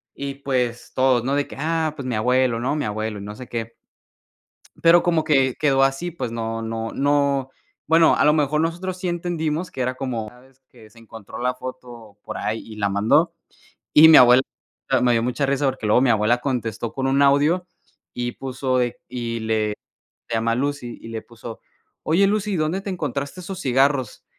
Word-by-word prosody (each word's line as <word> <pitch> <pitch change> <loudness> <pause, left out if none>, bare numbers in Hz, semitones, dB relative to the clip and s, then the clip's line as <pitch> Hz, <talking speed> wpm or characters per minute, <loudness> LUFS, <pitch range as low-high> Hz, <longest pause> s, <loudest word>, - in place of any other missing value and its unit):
Y 140 0 -5
pues 125 -4 -2
todos, 130 -2 +2
¿no? 135 - 0
De 145 0 0
que: - - -11
"Ah, 160 +1 0
pues 135 -3 -6
mi 125 - -2
abuelo", 125 +1 +1
¿no? 130 +4 -1
Mi 150 - -2
abuelo 110 0 -3
y - - -8
no 105 +1 -7
sé 125 - -9
qué. 115 -1 -5 1.1
Pero 170 +1 +6
como 170 -2 +2
que 135 -5 +2
quedó 135 -3 +2
así, 135 +6 -1
pues 160 -8 -5
no 115 0 -3
no 115 0 -4
no, 140 -1 +1 0.4
bueno, 165 +1 +5
a - - +3
lo 150 - +5
mejor 150 0 +1
nosotros 175 +3 -2
sí 180 0 -3
entendimos 170 -1 -2
que 130 - -8
era 130 +1 -1
como, 125 -5 -4
¿sabes?, 130 +3 -19
que 110 -3 -18
se 115 - -19
encontró 115 -2 -11
la 125 +1 0
foto 120 -5 -10
por - - -6
ahí 110 +1 -2
y 110 - -11
la 100 -1 0
mandó 100 +2 +2 0.6
y 155 +2 +9
mi 160 - +9
abuela 125 +1 +7 0.6
me 125 - +4
dio 115 - +2
mucha 125 +3 -1
risa, 140 +1 0
porque 130 -4 -2
luego 105 +4 +4
mi 130 - +3
abuela 110 +2 +2
contestó 120 -4 -3
con 135 -1 -3
un 135 +1 +2
audio 145 +6 +3 0.5
y 120 0 -3
puso 130 -1 -2
de 120 -1 -1
y 120 -2 -4
le 110 -1 0 0.6
se 115 - -3
llama 115 +1 +1
Lucy 135 -1 -3
y - - -10
le 115 -1 -5
puso: 115 0 -10 0.4
"Oye 175 +5 +3
Lucy, 210 0 -1
¿dónde 160 +5 -1
te 195 - -6
encontraste 145 -1 -4
esos 185 +1 -7
cigarros?". 135 - +1
130 Hz, 195 wpm, -22 LUFS, 115-150 Hz, 1.1 s, y